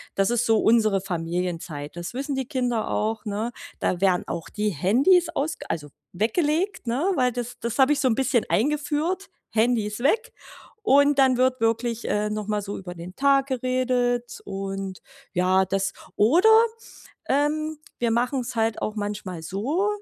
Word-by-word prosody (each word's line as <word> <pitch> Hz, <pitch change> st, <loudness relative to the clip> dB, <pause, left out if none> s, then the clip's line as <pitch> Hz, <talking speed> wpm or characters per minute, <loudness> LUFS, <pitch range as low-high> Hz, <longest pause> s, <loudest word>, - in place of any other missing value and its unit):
Das 195 Hz, +1 st, +2 dB
ist 240 Hz, 0 st, +1 dB
so 225 Hz, -1 st, +3 dB
unsere 215 Hz, -4 st, +3 dB
Familienzeit. 170 Hz, -4 st, -4 dB
Das 175 Hz, +5 st, -5 dB
wissen 275 Hz, +2 st, -3 dB
die 265 Hz, -2 st, -3 dB
Kinder 245 Hz, -5 st, -1 dB
auch, 220 Hz, +1 st, -1 dB
ne? 215 Hz, +3 st, -2 dB, 0.3 s
Da 180 Hz, -, 0 dB
werden 185 Hz, -2 st, +2 dB
auch 170 Hz, -1 st, -4 dB
die 210 Hz, 0 st, -1 dB
Handys 250 Hz, -, +3 dB
ausg 310 Hz, -1 st, -3 dB
also 150 Hz, -3 st, -4 dB, 0.2 s
weggelegt, 305 Hz, -, 0 dB
ne, 275 Hz, +12 st, +1 dB
weil 250 Hz, -2 st, +2 dB
das 245 Hz, 0 st, -5 dB
das 235 Hz, +2 st, -4 dB
habe 265 Hz, +2 st, +6 dB
ich 295 Hz, -, +2 dB
so 265 Hz, -, +2 dB
ein 235 Hz, -, +2 dB
bisschen 260 Hz, -2 st, +1 dB
eingeführt, 300 Hz, -, 0 dB, 0.2 s
Handys 220 Hz, -2 st, +1 dB
weg. 430 Hz, -, +1 dB, 0.5 s
Und 285 Hz, +1 st, +5 dB
dann 260 Hz, -2 st, +4 dB
wird 255 Hz, -1 st, +2 dB
wirklich, 230 Hz, +1 st, 0 dB
äh, 210 Hz, 0 st, 0 dB
noch 210 Hz, -1 st, -4 dB
mal 210 Hz, -1 st, 0 dB
so 200 Hz, 0 st, -5 dB
über 180 Hz, -2 st, -7 dB
den 175 Hz, +2 st, -9 dB
Tag 275 Hz, -1 st, +3 dB
geredet 250 Hz, -2 st, 0 dB
und 195 Hz, -1 st, -5 dB, 0.3 s
ja, 185 Hz, +1 st, +3 dB
das 195 Hz, +1 st, -1 dB, 0.2 s
oder, 330 Hz, -, +5 dB, 0.8 s
ähm, 305 Hz, +2 st, 0 dB, 0.2 s
wir 235 Hz, -1 st, +1 dB
machen's 245 Hz, +1 st, 0 dB
halt 225 Hz, -1 st, 0 dB
auch 215 Hz, -, -2 dB
manchmal 205 Hz, -4 st, -4 dB
so, 265 Hz, -, -1 dB
235 Hz, 160 wpm, -24 LUFS, 195-270 Hz, 0.8 s, habe